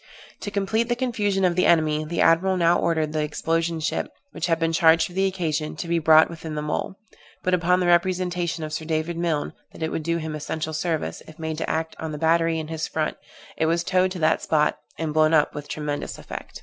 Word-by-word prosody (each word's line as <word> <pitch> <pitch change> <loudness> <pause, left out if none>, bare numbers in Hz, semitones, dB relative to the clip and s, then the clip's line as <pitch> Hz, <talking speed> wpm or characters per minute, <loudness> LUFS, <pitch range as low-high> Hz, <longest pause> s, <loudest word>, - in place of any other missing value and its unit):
To - - -5
complete 205 +4 0
the 240 - +2
confusion 210 -6 0
of 175 -1 +2
the 180 - +3
enemy, 155 -2 +3
the 165 +2 -2
admiral 185 +3 +4
now 170 0 +3
ordered 160 -2 0
the 155 - 0
explosion 165 +2 -1
ship, 155 - -2 0.2
which - - -3
had 165 -1 +2
been 165 0 0
charged 160 0 +5
for 175 - -9
the 190 +1 +2
occasion, 160 -5 -2
to 170 - -5
be 170 0 +1
brought 160 0 +6
within 160 -2 -7
the 150 - -3
mole; 150 +5 -2 0.5
but 185 - +1
upon 180 +1 +3
the 180 - +1
representation 175 -1 +1
of 155 0 -5
Sir 160 - -3
David 160 +1 -1
Milne 165 -3 -1 0.2
that - - -7
it 160 - -1
would - - -2
do 170 +2 -1
him 160 -1 -4
essential 155 +1 -4
service, 160 0 -2
if 160 - -13
made 160 -1 -4
to - - -2
act 160 0 -2
on 160 -1 -4
the - - -4
battery 165 +1 +2
in 160 -1 -4
his 160 -1 -3
front, 155 -1 -2 0.4
it 160 - +1
was 170 +1 +1
towed 185 +1 +2
to - - -6
that 155 +1 +3
spot, 150 -1 +1 0.2
and 160 -2 -2
blown 155 +1 +4
up 150 - +3
with 145 -1 -7
tremendous 150 -1 -4
effect. - - -8
165 Hz, 230 wpm, -24 LUFS, 155-175 Hz, 0.5 s, brought